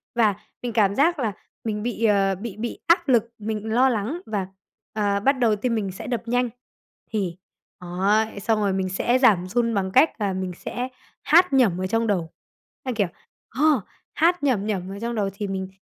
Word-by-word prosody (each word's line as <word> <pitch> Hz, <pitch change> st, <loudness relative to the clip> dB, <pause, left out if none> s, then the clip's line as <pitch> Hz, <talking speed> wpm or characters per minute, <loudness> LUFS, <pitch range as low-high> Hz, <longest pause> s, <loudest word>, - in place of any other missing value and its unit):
và 215 Hz, -4 st, +3 dB, 0.3 s
mình 240 Hz, -2 st, -4 dB
cảm 200 Hz, -3 st, +3 dB
giác 325 Hz, +3 st, +3 dB
là 220 Hz, -5 st, -1 dB, 0.3 s
mình 210 Hz, -2 st, -2 dB
bị, 230 Hz, -1 st, -1 dB
ờ, 195 Hz, -2 st, +3 dB
bị 205 Hz, +1 st, -7 dB
bị 235 Hz, +1 st, -4 dB
áp 335 Hz, -3 st, +4 dB
lực, 235 Hz, -2 st, +3 dB
mình 220 Hz, +1 st, -3 dB
lo 260 Hz, +2 st, +5 dB
lắng 240 Hz, -, -2 dB
và, 200 Hz, -4 st, -2 dB, 0.5 s
à, 205 Hz, -2 st, +1 dB
bắt 270 Hz, +7 st, +4 dB
đầu 225 Hz, -3 st, +3 dB
tim 230 Hz, +3 st, -1 dB
mình 200 Hz, -3 st, -2 dB
sẽ 190 Hz, -, -8 dB
đập 240 Hz, -2 st, -3 dB
nhanh. 245 Hz, 0 st, +1 dB, 0.6 s
Thì, 185 Hz, -5 st, -2 dB, 0.4 s
ấy, 200 Hz, +4 st, 0 dB
xong 220 Hz, +1 st, +1 dB
rồi 200 Hz, -2 st, +1 dB
mình 190 Hz, -1 st, -1 dB
sẽ 240 Hz, +7 st, +1 dB
giảm 195 Hz, -8 st, +4 dB
run 230 Hz, +3 st, 0 dB
bằng 190 Hz, -2 st, -1 dB
cách 260 Hz, -2 st, +4 dB
là 195 Hz, -2 st, 0 dB
mình 185 Hz, -1 st, -3 dB
sẽ 250 Hz, +1 st, -4 dB, 0.4 s
hát 345 Hz, 0 st, +5 dB
nhẩm 205 Hz, -9 st, +3 dB
ở 185 Hz, -, -1 dB
trong 225 Hz, +2 st, 0 dB
đầu. 175 Hz, -6 st, 0 dB, 0.5 s
A, 255 Hz, -, -2 dB
kiểu 205 Hz, -4 st, +1 dB, 0.4 s
ờ, 285 Hz, -1 st, +3 dB, 0.3 s
hát 340 Hz, 0 st, +2 dB
nhẩm 230 Hz, -8 st, +1 dB
nhẩm 190 Hz, -3 st, -2 dB
ở 200 Hz, -, -7 dB
trong 235 Hz, +1 st, -3 dB
đầu 200 Hz, -2 st, 0 dB
thì 205 Hz, 0 st, -4 dB
mình 190 Hz, -1 st, -3 dB
215 Hz, 200 wpm, -24 LUFS, 195-240 Hz, 0.6 s, lo